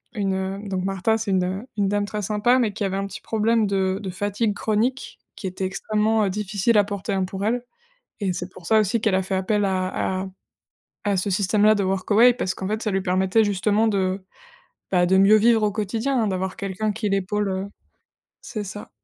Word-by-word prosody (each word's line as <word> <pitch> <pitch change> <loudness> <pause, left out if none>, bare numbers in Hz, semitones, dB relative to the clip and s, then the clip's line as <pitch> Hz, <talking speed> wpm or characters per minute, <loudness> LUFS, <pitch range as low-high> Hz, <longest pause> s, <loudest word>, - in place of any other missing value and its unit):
une 195 0 -2
donc 190 -1 -2
Martha, 195 +3 +1
c'est 215 -3 -3
une 190 +4 0
une 200 -1 +2
dame 205 +1 0
très 210 +1 -4
sympa, 215 +5 +2
mais 215 -4 +1
qui 210 - -4
avait 195 -1 -1
un 195 0 -2
petit - - -9
problème 225 0 +1
de 190 -1 0
de 190 - -5
fatigue 205 +3 -1
chronique, 225 +6 -1 0.2
qui 195 - -4
était 185 +1 -5
extrêmement, 215 +3 +1
heu, 195 - 0
difficile 210 +2 0
à 205 - +6
porter, 200 0 -4
hein, 190 -1 +1
pour 195 +2 -4
elle. 240 +2 0 0.6
Et 190 -2 0
c'est 180 +1 -5
pour 185 - -14
ça 220 +3 +4
aussi 215 +2 0
qu'elle 215 -5 +2
a 190 - +1
fait 190 +1 -3
appel 205 +2 +1
à 185 0 -1
à 190 - -5 0.8
à 205 -1 +2
ce 200 +2 -1
système-là 205 +3 +3
de 205 - 0
Workaway, 205 +6 +4
parce 190 -6 -2
qu'en 190 - -5
fait, 215 +2 -2
ça 215 - -1
lui 195 0 0
permettait 190 +4 +2
justement 205 +2 +1
de, 190 -2 0 0.7
bah, 180 -2 +3
de 190 +2 +3
mieux 200 +3 +7
vivre 225 0 +4
au 210 - +2
quotidien, 225 +6 -1
hein, 220 - +1
d'avoir 190 -1 -2
quelqu'un 200 +2 -2
qui 210 0 -2
l'épaule, 195 +1 0
heu 190 +1 -2 0.7
c'est 215 -3 -5
ça. 205 +1 -8
200 Hz, 210 wpm, -23 LUFS, 190-215 Hz, 0.8 s, mieux